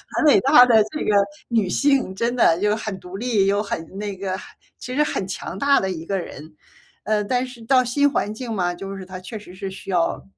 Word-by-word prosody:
很 - - +1
伟 295 - +6
大 265 -2 +7
的 230 -3 +5
这 305 - -3
个 - - +1 0.4
女 225 -5 +1
性， 270 -2 +1
真 235 +4 -1
的， 165 -7 +4
就 210 0 +2
很 215 -3 -5
独 180 +1 -8
立， 215 -4 +1
又 200 +1 +2
很 165 -5 -4
那 205 -1 -4
个 190 0 -3
很 - - -10 0.4
其 250 +1 -6
实 300 - +4
很 195 -10 -3
强 190 -1 -6
大 280 0 +4
的 190 - -1
一 165 -2 -6
个 195 +2 -1
人。 155 -3 -8 0.5
呃， 215 -1 +1
但 250 +4 0
是 250 -2 -12
到 255 +1 +4
新 285 +4 +2
环 210 -6 -1
境 235 0 -5
嘛， 180 -4 0
就 195 +2 -7
是 190 - -8
它 185 0 -8
确 215 +4 -8
实 205 -3 -13
是 195 +1 -5
需 195 - -10
要 175 -3 0
210 Hz, 255 characters per minute, -22 LUFS, 190-250 Hz, 0.5 s, 大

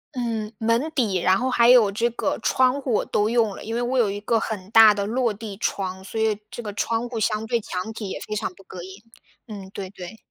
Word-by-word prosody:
嗯， 225 -3 -2
门 230 +7 +1
底， 215 -8 +1
然 185 +2 +3
后 255 +3 -1
还 235 -1 +5
有 235 -5 +6
这 230 +4 0
个 235 - -2
窗 260 +2 +2
户 260 -3 -2
我 - - +1
都 210 +1 +1
用 225 -4 +1
了， - - -9
因 225 +1 -4
为 240 - 0
我 250 +2 0
有 220 -4 +3
一 205 - -4
个 225 +2 +1
很 210 -3 -5
大 225 -1 +9
的 200 -1 -1
落 235 +2 0
地 210 -1 -7
窗， 190 -3 -3
所 220 +3 -5
以 220 -2 +1
这 240 - -7
个 210 - -5
窗 230 +3 -1
户 235 -2 -4
相 215 +1 0
对 235 0 0
墙 195 +3 -5
体 210 -3 -6
也 - - -5
非 215 - -3
常 205 - -2
不 195 - -17
隔 185 -1 -9
音， 190 +3 -11 0.4
嗯， 200 -4 -8
对 195 0 -6
对。 190 +1 -9
220 Hz, 270 characters per minute, -23 LUFS, 200-235 Hz, 0.4 s, 大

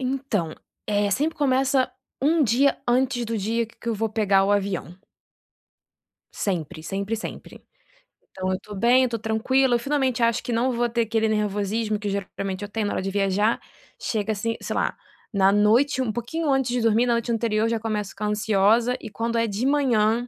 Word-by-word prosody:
Então, 255 - -2 0.3
eh, 205 -1 +1
sempre 300 +10 0
começa 265 -1 +2 0.3
1 310 +4 +3
dia 270 +3 +3
antes 245 0 +1
do 230 0 -3
dia 225 +3 -1
qu 230 - -22
que 235 - -6
eu 230 - +1
vou 220 +1 -1
pegar 205 -3 +2
o 200 - +2
avião 195 -3 -2 1.4
sempre, 160 -5 -3
sempre, 200 +5 -2
sempre. 225 - -8 0.7
Então 185 0 -3
eu 185 - -1
tô 210 - -10
bem 240 +5 +4
eu 255 - +1
tô 230 -1 -3
tranquila 240 +4 +2
eu - - +1
finalmente 260 -2 0
acho 230 0 +2
que 245 - -3
não 240 +3 +1
vou 240 0 0
ter 235 0 0
aquele 225 0 +1
nervosismo 210 0 -1
que 205 - -4
geralmente 195 -1 -4
eu 205 - -6
tenho 215 0 -2
na - - -2
hora - - -1
de 195 +1 -3
viajar, 200 +2 +1 0.4
chega 220 -1 -1
assim, 225 +2 -2
sei - - -4
lá, - - 0 0.4
na 195 -1 +4
noite 230 +7 +3
um 245 -4 -1
pouquinho 285 +8 -3
antes 265 -2 +1
de 245 - 0
dormir 225 +1 +3
na 240 - +2
noite 235 0 -1
anterior 225 -1 +1
já 230 -1 0
começo 210 -3 -3
ficar 210 +1 -4
ansiosa 215 +3 +2
e 225 - -7
quando 230 +2 -2
é 230 - +2
de 210 +4 -2
manhã, 240 -5 +2
225 Hz, 195 wpm, -24 LUFS, 205-245 Hz, 1.4 s, bem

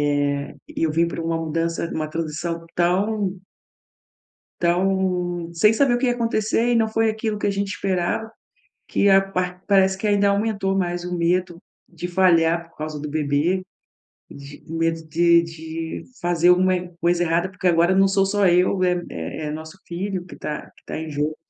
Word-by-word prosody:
eh, 145 0 -1
e - - -4
eu 160 - +2
vim 165 +2 +2
pra 170 - -4
uma 165 0 -1
mudança 165 +1 -2
uma 155 -1 -3
transição 165 +1 -4
tão 190 +2 0 1.2
Então, 180 -1 0
sem 210 +6 +4
saber 250 +2 +3
o - - +1
que 255 - 0
ia 245 - +3
acontecer 230 0 0
e - - +3
não 225 -1 +2
foi 225 0 +2
aquilo 215 -1 -3
que - - -1
a - - +2
gente 200 0 -2
esperava, 190 +4 -1 0.6
que 200 - +2
a 195 0 +7
par 185 -1 -3
parece 190 -1 +3
que 210 - -2
ainda 205 -1 +3
aumentou 200 -1 0
mais 175 -2 -1
o 180 0 -3
medo 175 0 0 0.3
de 175 0 -6
falhar 170 -2 +3
por - - -29
causa 155 0 -5
do 150 - -5
bebê, 150 +5 0 0.7
de 140 +1 -11
medo 165 0 -1
de 170 +1 +4
de 160 0 -6 0.2
fazer 175 0 +2
alguma 185 +1 +4 0.3
coisa 175 0 +2
errada, 170 +2 +1
porque 185 0 -5
agora 170 +1 +4
não 195 +1 +5
sou 195 0 +2
só 205 0 +2
eu, 180 +2 +3
é 180 -1 +1
é 80 - -5
é - - -3
nosso 160 +4 -8
filho 185 +1 -4
que - - -11
tá 150 - -6
que - - -23
tá - - -5
em 160 0 -5
jogo 150 +1 -2
175 Hz, 185 wpm, -22 LUFS, 165-195 Hz, 1.2 s, a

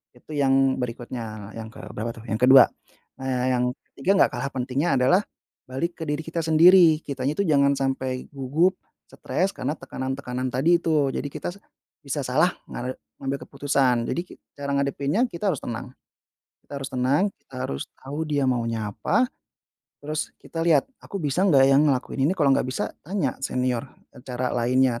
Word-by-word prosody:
itu 125 - -15
yang 135 -1 +3
berikutnya, 115 -4 -5
yang 110 - -6
ke - - -13
berapa 115 +2 -3
tuh? - - -12
Yang 110 +4 +2
ke-2. 135 -1 +11 0.6
Nah, 130 -1 -1
yang 125 -1 +1 0.3
ke-3 140 +8 +1
enggak - - +5
kalah 130 +3 -2
pentingnya 130 +5 -1
adalah 155 +10 +4 0.5
balik 165 +8 -3
ke - - -3
diri 150 0 -1
kita 165 +1 -4
sendiri. 165 0 +7
Kitanya 135 0 -2
itu 200 - +1
jangan 140 -2 +4
sampai 130 -1 -2
gugup, 150 +7 +1 0.3
stres - - -1
karena - - -2
tekanan-tekanan 130 -1 -4
tadi 165 +7 +4
itu. 155 -4 +2
Jadi 145 - -3
kita - - -5
s - - -14 0.5
bisa 145 +1 -2
salah 155 +8 +3 0.2
nga 125 +1 -4 0.3
ngambil 135 +1 -2
keputusan. 135 -4 +1
Jadi 170 - -1
ki - - -12 0.2
cara 140 0 -4
ngadepinnya 140 - 0
kita 170 +4 -3
harus 150 - -3
tenang. 120 +2 -5 0.7
Kita 140 - -6
harus 135 - -4
tenang, 130 +6 +2 0.2
kita 135 - -16
harus 70 - -3
tahu 145 +4 -4
dia 145 -2 +1
maunya 115 -3 -1
apa, 110 - +1 0.8
terus 150 +1 -3
kita 165 - -5
lihat, 155 -5 +4 0.2
aku 200 - -6
bisa 150 +5 0
enggak 135 -7 +6
yang 135 +1 +5
ngelakuin 135 +1 0
ini. - - +2
Kalau 145 -5 +3
enggak - - 0
bisa 130 - -1 0.2
tanya 175 -7 -1
senior, 125 -1 -1 0.3
eee, 125 - -13
cara 125 -1 -2
lainnya. 125 0 +2
135 Hz, 175 wpm, -25 LUFS, 125-150 Hz, 0.8 s, ke-2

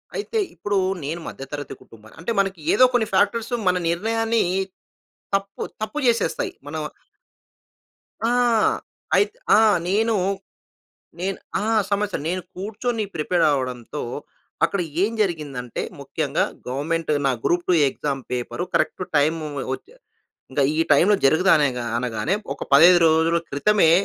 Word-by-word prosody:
అయితే 445 +2 -3 0.2
ఇప్పుడు 200 +4 -1 0.3
నేను 165 +4 -4
మధ్యతరగతి 145 +1 -7
కుటుంబాన్ని 110 +1 -17
అంటే, 185 - -2
మనకి 195 -2 0
ఏదో 255 - +7
కొన్ని 225 -3 +2
ఫ్యాక్టర్స్, 220 +5 +1
మన 180 - +4
నిర్ణయాన్ని 225 +5 +1 0.9
తప్పు 195 0 -3 0.2
తప్పు 220 +8 -3
చేసేస్తాయి. 230 -8 +1 0.2
మనం 155 +2 -4 1.5
ఆ! 235 - +2 0.9
ఐత్ 425 +3 -5 0.2
ఆ! - - +6 0.3
నేను 220 +4 +2 1.1
నేను 190 +1 -2 0.2
ఆ! - - -2 0.2
సమస్య 205 0 0
నేను 185 +1 -2
కూర్చొని 220 +4 -3
ప్రిపేర్ 170 +3 +1
అవ్వడంతో, 130 0 -3 0.6
అక్కడ 185 +3 0 0.2
ఏం 215 +3 +1
జరిగిందంటే, 145 - -2 0.2
ముఖ్యంగా - - -1 0.2
గవర్నమెంట్ 155 +5 -2 0.2
నా 135 - +3
group two 175 0 +2
exam 135 0 -3
paper 125 +7 -3
correct 185 - +1
time 155 +2 +2 0.3
వచ్చే 460 - -13 0.6
ఇంకా 140 - +1
ఈ - - +1
టైమ్‌లో 180 +8 +5
జరగదు. 160 +7 +4
అన 150 - +3 0.3
అనగానే, 120 - -1 0.2
ఒక - - -6
15 175 +5 +8
రోజుల 160 +1 +3
క్రితమే 165 +5 +3
175 Hz, 120 wpm, -23 LUFS, 145-210 Hz, 1.5 s, 15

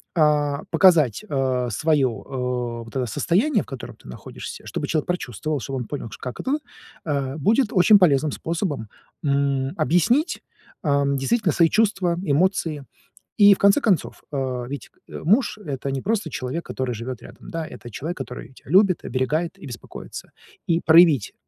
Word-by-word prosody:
а, 150 -2 +2
показать, 165 - +4
э, 130 - 0
своё, 150 +1 +2
э, 125 -1 -4
вот 115 - -14
это 130 - 0
состояние, 205 - +1
в - - -18
котором 135 -3 -8
ты - - -19
находишься, 60 - -9
чтобы - - -4
человек 155 -3 -1
прочувствовал, 155 - -2
чтобы 135 +2 -5
он 125 - -4
понял, 135 -4 -6
как 125 -2 -7
это, 275 +3 0 0.5
э, 140 -2 -2
будет 225 - +3
очень 205 +3 +6
полезным 150 -4 +3
способом, 160 - -3 0.3
м, 140 0 0
объяснить, 180 - +2 0.4
ам, 140 -2 +1
действительно 175 - +1
свои 165 -2 +4
чувства, 195 -5 +2
эмоции. 155 -2 0 0.5
И 205 -1 +8
в - - -3
конце 200 +8 +4
концов, 195 -7 0
э, 130 -3 -2
ведь, 135 -4 -7 0.2
э, - - -8
муж- 215 - +2
это 140 -2 -3
не 135 -1 -3
просто 210 - -1
человек, 145 +4 -4
который 125 -2 -3
живёт 120 +2 -6
рядом, - - -13
да, 165 -1 -4
это 120 - -10
человек, 160 - -5
который 125 - -7
тя 130 - -18
любит, 190 0 +4
оберегает 150 +6 -1
и - - -11
беспокоится. - - -9 0.4
И 170 -1 +2
проявить, 160 - +6
150 Hz, 160 wpm, -23 LUFS, 130-180 Hz, 0.5 s, И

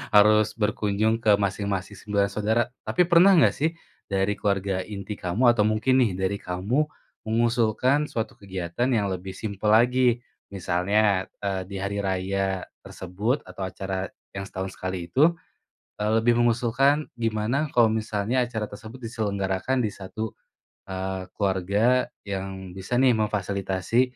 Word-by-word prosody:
harus 105 +1 +5
berkunjung 105 +1 +1
ke 105 -3 +5
masing-masing 100 0 -2
9 100 -1 0
saudara. 110 +3 +1 0.2
Tapi 180 - +3
pernah 180 +2 +6
gak 160 - +6
sih 160 +3 0 0.4
dari 95 0 +1
keluarga 100 -2 0
inti 100 0 -6
kamu 110 +7 +3
atau 105 -3 +2
mungkin 130 +5 +2
nih 110 -7 +2
dari 95 +2 -1
kamu 105 +12 -1 0.4
mengusulkan 120 +5 +2
suatu 110 -4 -4
kegiatan 95 +3 -3
yang 105 -6 +1
lebih 95 +1 -5
simpel 105 0 -4
lagi 120 +1 +3 0.3
misalnya, 95 +1 +1 0.2
eee, 95 -2 -1
di 100 - -8
hari 100 +1 -2
raya 95 0 -1 0.2
tersebut 100 +9 -3
atau 95 -1 -6
acara 95 0 -4 0.2
yang 95 0 -6
setahun 95 -1 -5
sekali 95 -2 -4
itu, 155 - +4 0.7
eee, 105 - +1
lebih 120 +1 +3
mengusulkan 120 +5 +2
gimana 115 +5 -1
kalau 120 -3 +5
misalnya 110 +3 0
acara 115 -3 -3
tersebut 110 +4 -10
diselenggarakan 100 +1 -1
di - - -2
1, 100 +3 -6 0.5
eee, 95 0 -4
keluarga 100 +6 +2 0.2
yang 95 -1 -5
bisa 95 +6 -3
nih 130 -1 +5
memfasilitasi, 100 0 0
105 Hz, 135 wpm, -25 LUFS, 95-120 Hz, 0.7 s, pernah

